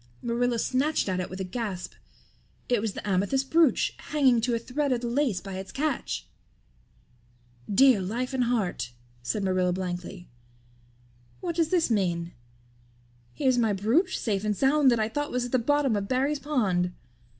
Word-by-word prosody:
Marilla 240 0 0
snatched 265 +5 0
at 185 -1 -1
it 180 - -3
with 185 - -7
a - - -1
gasp. 190 -2 -4 0.7
It 240 -4 +2
was 220 -2 -2
the - - -7
amethyst 205 +8 0
brooch, 325 -4 +3 0.2
hanging 265 -6 +3
to 235 +1 +1
a - - +1
thread 265 +5 -2
of 245 -2 0
the 240 - -3
lace 240 -5 0
by 190 -1 -6
its 190 - -8
catch! 295 -2 -2 1.4
"Dear 250 0 +5
life 240 +8 -3
and 255 -2 +1
heart," 185 - -1 0.3
said 200 - -2
Marilla 185 -1 +1
blankly, 180 0 -5 1.1
"what 345 -3 -3
does 330 -2 +1
this 335 -7 +2
mean? 175 -5 0 1.0
Here's 255 - +2
my 225 -3 +2
brooch 240 - +1
safe 205 -3 -1
and 210 -2 -1
sound 275 0 +4
that 235 -2 +2
I 215 - +1
thought 290 +6 -3
was 250 0 -1
at 245 - -7
the 255 - +3
bottom 275 -1 +2
of 200 -1 -2
Barry's 275 +4 0
pond. 195 -12 0
235 Hz, 170 wpm, -27 LUFS, 195-270 Hz, 1.4 s, Dear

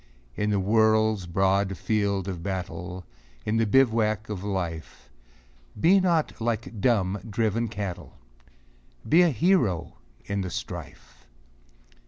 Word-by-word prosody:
In 105 - -1
the 100 -1 +1
world's 110 -1 +2
broad 95 +2 +1
field 100 -3 0
of 90 -3 -4
battle, 90 -1 -5 0.4
In 110 +1 0
the 115 -1 +2
bivouac 110 -4 +2
of 100 -3 -5
Life, 90 -5 -5 0.7
Be 190 - +5
not 170 -9 0
like 115 -2 -3
dumb, 100 -4 +2
driven 115 +2 0
cattle! 100 -4 -6 0.9
Be 165 +4 +6
a 175 - +5
hero 125 - +1 0.3
in 100 0 -2
the 95 - -3
strife - - -8
105 Hz, 120 wpm, -26 LUFS, 95-115 Hz, 0.9 s, Be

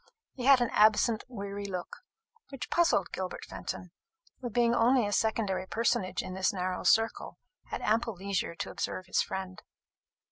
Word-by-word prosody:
He 250 - -5
had 270 -2 +7
an 240 - +1
absent 215 +1 +4
weary 200 -4 -6
look, 180 -2 -5 0.5
which 275 -2 -7
puzzled 330 - +2
Gilbert 185 -1 -5
Fenton, 180 - -6 0.5
who, 245 - -4
being 235 +1 +2
only 240 0 +4
a 205 - -2
secondary 205 -4 0
personage 225 -3 0
in 185 - -6
this 190 0 +1
narrow 185 -1 -3
circle, 225 0 +2 0.3
had - - -5
ample 225 0 +1
leisure 190 -2 -2
to - - -5
observe 185 - -4
his 185 - +1
friend. 190 -1 -5
205 Hz, 155 wpm, -30 LUFS, 185-235 Hz, 0.5 s, had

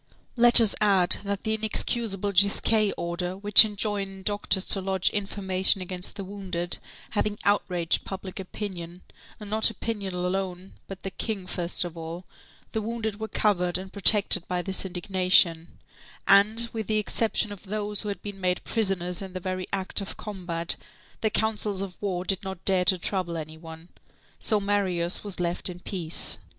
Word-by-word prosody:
Let 240 -1 +10
us 225 -3 +5
add, 195 -4 +4
that 200 -1 -4
the 220 - -1
inexcusable 215 -2 -1
Gisquet 200 +2 +3
order, 175 +2 -4
which 205 +2 +8
enjoined 200 -2 -4
doctors 205 -2 +1
to 195 - -1
lodge 190 -1 +1
information 195 -1 0
against 185 0 -4
the 200 - -6
wounded, 185 -3 -3 0.3
having 210 -1 -1
outraged 180 -4 0
public 190 -1 -7
opinion, 180 -2 -7 0.4
and 210 - -9
not 220 +2 +3
opinion 205 -3 -5
alone, 180 +1 -4
but 195 -1 -9
the 195 - -5
King 200 -2 -4
first 175 -1 +2
of 175 -1 -8
all, 165 +2 -8 0.5
the 220 - -2
wounded 220 -1 -4
were 220 - -4
covered 180 -5 0
and 190 0 -9
protected 200 -2 +6
by 180 -1 -2
this 190 0 0
indignation; 180 -2 +1 0.5
and, 215 +4 +4
with 220 -2 -4
the 215 - 0
exception 215 0 0
of 205 0 -10
those 210 +1 0
who 210 - -5
had 200 - -6
been 200 -2 -8
made 180 -1 -1
prisoners 190 -5 -2
in 190 -2 -8
the 185 - -4
very 185 0 -4
act 195 +1 -2
of 195 - -6
combat, 175 -5 -1 0.4
the 220 - +1
councils 210 -2 -1
of 190 -2 -6
war 185 -3 -3
did 195 0 0
not 190 -3 -8
dare 185 -2 +3
to 185 - +4
trouble 175 -1 -2
any 155 0 -7
one. 160 +1 -12 0.5
So 215 -3 +1
Marius 190 -4 0
was 200 -3 -5
left 175 +1 -1
in 175 -1 -8
peace. 175 -3 0
195 Hz, 165 wpm, -25 LUFS, 180-205 Hz, 0.5 s, Let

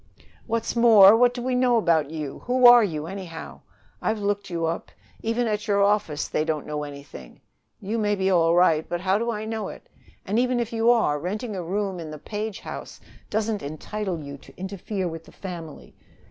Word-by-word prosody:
"What's 230 0 -2
more, 220 -4 +8
what 245 +1 +5
do 245 -1 -6
we 255 0 -1
know 250 -1 +3
about 165 -8 +2
you? 150 -3 -6
Who 250 0 +2
are 240 -1 +9
you, 155 -6 -3
anyhow? 180 -2 -8 0.4
I've 220 - 0
looked 205 -1 -2
you 170 -2 -2
up. 165 +1 -3 0.3
Even 230 +2 0
at 210 0 -2
your 200 -1 +3
office 200 -8 +1
they 155 - 0
don't 155 -2 -2
know 150 0 -4
anything. 140 - -10 0.4
You 215 +4 -3
may 205 -1 +1
be 190 -1 0
all 170 -2 +4
right, 165 -3 +4
but 175 0 -2
how 190 +2 +2
do 235 +1 -1
I 215 -2 -3
know 220 -2 -3
it? - - -11 0.4
And, 210 +4 0
even 250 0 +1
if 235 -1 -3
you 225 +1 +2
are, 220 -12 +3
renting 210 - -4
a 185 - -3
room 190 +1 -2
in 160 -2 -7
the 155 - -7
Page 210 +4 -5
house - - -8 0.3
doesn't 215 -1 -1
entitle 175 +5 -4
you 140 0 -8
to - - -18
interfere 190 0 -4
with 165 -1 -6
the - - -15
family. 170 -5 -9
200 Hz, 200 wpm, -24 LUFS, 165-225 Hz, 0.4 s, are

